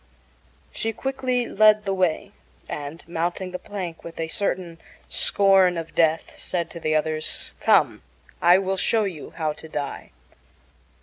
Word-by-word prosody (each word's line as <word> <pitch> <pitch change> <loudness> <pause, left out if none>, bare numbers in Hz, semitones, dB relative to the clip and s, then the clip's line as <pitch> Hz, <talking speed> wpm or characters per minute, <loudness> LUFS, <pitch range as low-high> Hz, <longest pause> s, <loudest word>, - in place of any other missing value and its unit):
She 225 0 -2
quickly 255 -1 -1
led 215 0 +5
the 195 - 0
way, 180 -4 0 0.4
and, 150 +3 -6
mounting 175 +2 -2
the 180 - -5
plank 180 -5 -6
with 165 0 -9
a 160 0 -2
certain 175 -3 -2 0.3
scorn 195 -3 +4
of 165 0 -5
death, 160 -1 +1
said 175 -2 -3
to 170 - -8
the 155 -1 0
others: 155 0 -1
"Come, - - +3 0.4
I 175 +2 +7
will 190 0 -1
show 220 +3 +2
you 180 -7 -5
how 155 -2 0
to 160 - -10
die." 145 -2 -4
175 Hz, 145 wpm, -24 LUFS, 160-195 Hz, 0.4 s, I